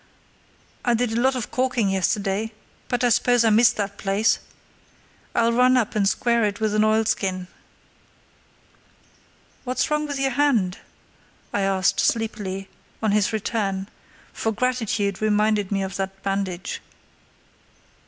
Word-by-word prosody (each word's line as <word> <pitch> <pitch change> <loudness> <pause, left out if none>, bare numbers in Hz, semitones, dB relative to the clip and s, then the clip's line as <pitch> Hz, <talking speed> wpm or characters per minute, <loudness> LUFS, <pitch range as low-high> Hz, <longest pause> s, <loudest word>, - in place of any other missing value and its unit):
I 240 -1 +2
did 240 0 0
a 230 +1 0
lot 265 +1 +3
of 245 -4 -4
caulking 250 -5 +1
yesterday, 195 +3 -1 0.3
but 245 0 -1
I 245 - +4
suppose 245 +1 +3
I 225 - +4
missed 230 +3 +5
that 200 -1 -3
place. 200 +3 +2 1.0
I'll 230 0 +3
run 250 +2 +4
up 230 -4 0
and 200 -2 +3
square 235 0 +1
it 205 0 -1
with 215 -1 0
an 215 0 +3
oilskin." 215 -4 +1 2.2
"What's 255 +4 -1
wrong 300 0 0
with 285 -1 -3
your 270 0 +1
hand?" 240 -11 +1 0.7
I 205 - +1
asked, 195 -1 +1
sleepily, 205 -4 -1 0.4
on 215 - +2
his 205 0 +2
return, 205 -3 -2 0.4
for 225 - -1
gratitude 220 -5 -1
reminded 210 -1 +1
me 195 -1 0
of 195 0 -5
that 195 0 -5
bandage. 195 -2 -3
215 Hz, 135 wpm, -23 LUFS, 195-235 Hz, 2.2 s, missed